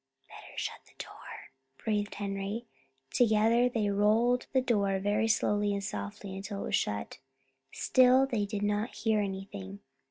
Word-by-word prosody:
"Better - - -13
shut - - -3
the - - -23
door," - - -10 0.3
breathed 210 -1 -2
Henry. 200 +3 -3 0.5
Together 230 +1 +4
they 225 -4 0
rolled 220 +5 +3
the 265 - +3
door 205 -6 +1
very 205 +3 +1
slowly 210 -2 +2
and 200 0 -3
softly 145 - -5
until 200 +1 -5
it - - -4
was - - +1
shut. 105 0 -2 0.5
Still 255 +1 +5
they 225 -6 -1
did 205 0 -3
not 210 +3 0
hear 220 -1 +1
anything. 195 0 -6
205 Hz, 150 wpm, -30 LUFS, 200-225 Hz, 0.5 s, Still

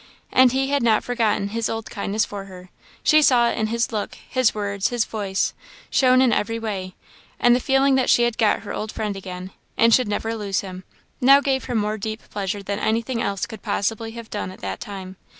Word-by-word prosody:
And 255 -1 +6
he 270 +2 0
had 285 - +2
not 225 -2 +3
forgotten 225 -5 0
his 225 +1 -2
old 225 -1 -5
kindness 205 +1 -1
for 200 -1 -7
her; 185 -1 -12 0.3
she 310 0 +5
saw 240 -5 +4
it - - -4
in 215 - +1
his 235 +2 -1
look, 210 -2 -3
his 255 -4 0
words, 200 -1 -1
his 240 -3 0
voice, 200 -3 -2 0.4
shown 255 -1 +5
in 245 -4 +3
every 225 +2 0
way; 195 -5 -4 0.4
and 240 0 +5
the - - +1
feeling 270 +1 +3
that 260 -1 +2
she 240 - +5
had 240 -1 0
got 220 -2 +3
her 205 - -6
old 215 0 -4
friend 210 -2 -3
again, 185 -1 -7 0.3
and 230 0 +5
should 255 -1 +4
never 225 +2 -2
lose 200 -3 -1
him, 185 -1 -9 0.4
now 275 +2 +7
gave 270 -2 -1
her 245 - -3
more 215 0 0
deep 215 +2 -5
pleasure 200 0 -3
than 200 +1 -3
anything 230 +2 -1
else 200 -3 -1
could 220 - -10
possibly 225 +2 -2
have 230 -1 -9
done 205 -3 -3
at 185 - -12
that - - -4
time. 190 -2 -8
220 Hz, 220 wpm, -22 LUFS, 200-240 Hz, 0.4 s, now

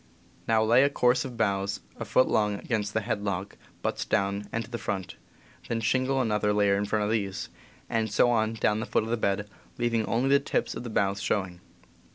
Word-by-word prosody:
Now 110 -1 +3
lay 115 +3 +5
a 140 - +4
course 125 -2 +2
of 125 -3 -7
boughs 100 -2 0 0.2
a - - -6
foot 130 - +3
long 105 -1 +1
against 105 -1 -2
the 110 - +2
head 110 -1 -2
log, 100 -1 -3 0.3
butts - - -1
down 100 +1 0
and 115 -1 -2
to 120 - -17
the 120 - -3
front, 95 -3 -4 0.5
then 115 - -1
shingle 130 +4 +1
another 105 -3 +1
layer 100 -1 +3
in 100 +1 0
front 105 0 0
of 105 - -1
these, 100 -3 -2 0.4
and 110 -2 -1
so 120 +3 +4
on 110 -1 +1
down 105 -1 +1
to 110 - -3
the - - -18
foot - - +2
of 110 - -5
the - - +3
bed, 105 -2 -1 0.3
leaving 115 -2 0
only 125 +4 +1
the 140 0 +6
tips 140 - -1
of - - -6
the 120 - -5
boughs 100 -2 0
showing. 95 -3 -1
110 Hz, 220 wpm, -27 LUFS, 100-120 Hz, 0.5 s, the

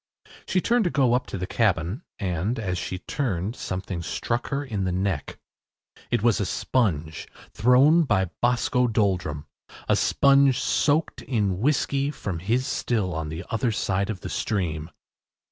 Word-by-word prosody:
She 185 - +1
turned 235 +3 +2
to - - +2
go 130 -6 +2
up 125 - 0
to - - -5
the 90 - -3
cabin, 100 - 0 0.2
and, 95 +3 -1
as 95 -5 -2
she 90 +1 -4
turned 105 - -2
something 95 -1 -4
struck 120 +7 -2
her 140 +1 -2
in 105 -7 -3
the 95 - 0
neck. 95 -4 -2 0.7
It - - 0
was 115 -3 +3
a - - 0
sponge, 80 - -1 0.3
thrown 135 +9 +5
by 95 -8 +1
Boscoe 125 +1 +2
Doldrum 95 -9 0 0.4
a - - +4
sponge 140 -2 +4
soaked 150 +2 +1
in 100 -7 -1
whiskey 140 +2 +1
from 105 - -4
his 115 +9 0
still 105 -10 -1
on 80 -1 -3
the 80 +4 -6
other 115 +1 +1
side 100 -2 -1
of 100 -6 -4
the - - -6
stream. 80 -6 -2
105 Hz, 160 wpm, -25 LUFS, 90-125 Hz, 0.7 s, thrown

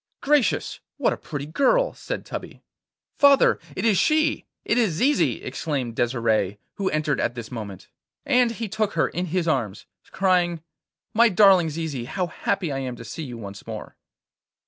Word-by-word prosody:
'Gracious! 290 -4 +1 0.2
what - - +2
a - - -3
pretty 145 -3 -6
girl!' - - +2
said - - -6
Tubby. - - -8 0.6
'Father! 280 -1 +5 0.2
it 190 - -2
is 210 -5 +4
she! 310 0 +2 0.2
it - - +1
is 215 -8 +2
Zizi!' 170 - +1
exclaimed 130 -3 -3
Desire, 115 -5 0 0.2
who 195 -2 0
entered 150 -1 0
at 120 - -1
this 115 -2 -7
moment. 105 -6 -7 0.4
And 245 -1 +4
he 230 -1 -4
took 210 +1 -1
her - - +1
in 180 +2 -3
his 175 0 -1
arms, 115 -10 -1 0.2
crying: 175 -4 +1 0.5
'My 235 +2 +5
darling 190 -4 +5
Zizi, 150 -6 -4
how 180 +8 -2
happy 175 0 -2
I 135 - -2
am 130 -2 -4
to 115 - -10
see 115 +8 -7
you 125 -6 -6
once 100 -3 -9
more! - - -7
165 Hz, 170 wpm, -24 LUFS, -, 0.6 s, Father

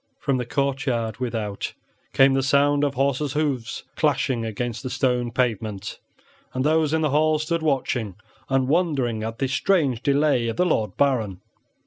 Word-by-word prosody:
From 140 -3 0
the 125 -2 -3
courtyard 130 -5 -1
without 115 -5 -3 0.4
came 135 0 +5
the 135 - +2
sound 145 +1 +3
of 140 -1 0
horses' 140 +1 0
hoofs 140 -7 -2
clashing 120 -4 +1
against 115 +1 -3
the 130 - -5
stone 125 -2 0
pavement, 110 -5 -2 0.6
and 130 - 0
those 155 -1 +2
in 160 0 +1
the 155 -3 +1
hall 155 +2 +3
stood 160 +2 -1
watching 125 - -1 0.3
and 135 -1 +2
wondering 140 -8 +1
at 115 +1 -4
this 135 0 -1
strange 145 -7 +1
delay 140 -4 +2
of 115 - -3
the 180 - +3
Lord 110 - 0
Baron. 115 -10 +1
135 Hz, 160 wpm, -24 LUFS, 115-145 Hz, 0.6 s, came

